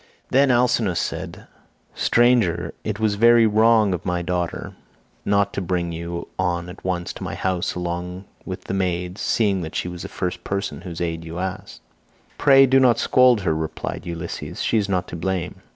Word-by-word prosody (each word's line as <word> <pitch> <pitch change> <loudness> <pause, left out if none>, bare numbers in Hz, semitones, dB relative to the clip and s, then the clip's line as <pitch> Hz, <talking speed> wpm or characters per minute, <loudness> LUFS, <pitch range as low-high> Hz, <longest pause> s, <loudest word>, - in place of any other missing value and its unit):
Then 135 +1 +4
Alcinous 120 -7 +2
said, - - -5 0.5
"Stranger, 105 -9 +2
it 105 -1 -3
was 110 -2 +2
very 115 +2 +5
wrong 110 -1 +4
of 90 - -4
my 90 -1 -1
daughter 90 -1 -3 0.5
not 100 0 +2
to - - -2
bring 90 -2 -1
you 85 +1 -5
on 85 0 -1
at 90 - -11
once 90 -2 -2
to - - -8
my - - -4
house 95 -2 -1
along 90 +1 -4 0.2
with 95 0 -6
the - - -5
maids, 90 0 -2
seeing 100 -5 +1
that 80 -2 -6
she - - -1
was 90 -1 -6
the - - -5
first 90 -1 -4
person 100 0 -3
whose 85 -2 -7
aid 85 -1 -2
you 80 +1 -7
asked." 95 0 -5 0.6
"Pray 135 -1 +7
do 135 0 +4
not 125 -3 +4
scold 125 -4 +4
her," 85 -4 +1
replied 80 +2 -4
Ulysses; 85 -1 -5
"she 115 - +2
is 100 -1 -2
not 90 -2 0
to - - -6
blame. 90 +1 -3
95 Hz, 185 wpm, -22 LUFS, 85-110 Hz, 0.6 s, Pray